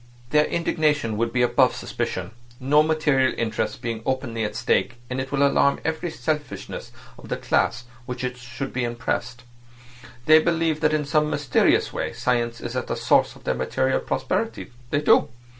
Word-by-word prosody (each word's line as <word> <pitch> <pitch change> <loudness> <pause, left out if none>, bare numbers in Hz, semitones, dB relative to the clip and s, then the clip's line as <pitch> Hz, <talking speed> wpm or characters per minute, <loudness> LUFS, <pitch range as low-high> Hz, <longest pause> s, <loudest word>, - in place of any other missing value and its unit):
Their 150 0 +4
indignation 150 -8 0
would 115 +1 0
be 125 +1 +2
above 120 - +3
suspicion, - - -4 0.3
no 140 +3 +4
material 150 -4 +2
interests 110 -1 -1
being 115 -2 -4
openly 130 -4 -2
at 105 - -3
stake, 120 - +1 0.2
and 130 +1 -1
it 135 - -6
will 140 0 +3
alarm 140 0 +3
every 160 +2 -1
selfishness 150 0 -4 0.3
of - - -12
the - - -1
class 125 +2 0 0.2
which 125 0 -4
should 125 +2 -7
be 125 - -1
impressed. 120 +1 -3 0.8
They 155 0 +8
believe 165 -1 +1
that 155 -1 +3
in 150 -1 -1
some 150 +1 +2
mysterious 145 -4 +2
way - - -3
science 120 -2 -1
is 120 +1 -5
at 130 - -2
the - - -2
source 115 0 +2
of - - -17
their - - 0
material 130 0 0
prosperity. 135 +12 -2 0.2
They 145 - +1
do. - - +4
130 Hz, 170 wpm, -24 LUFS, 120-150 Hz, 0.8 s, They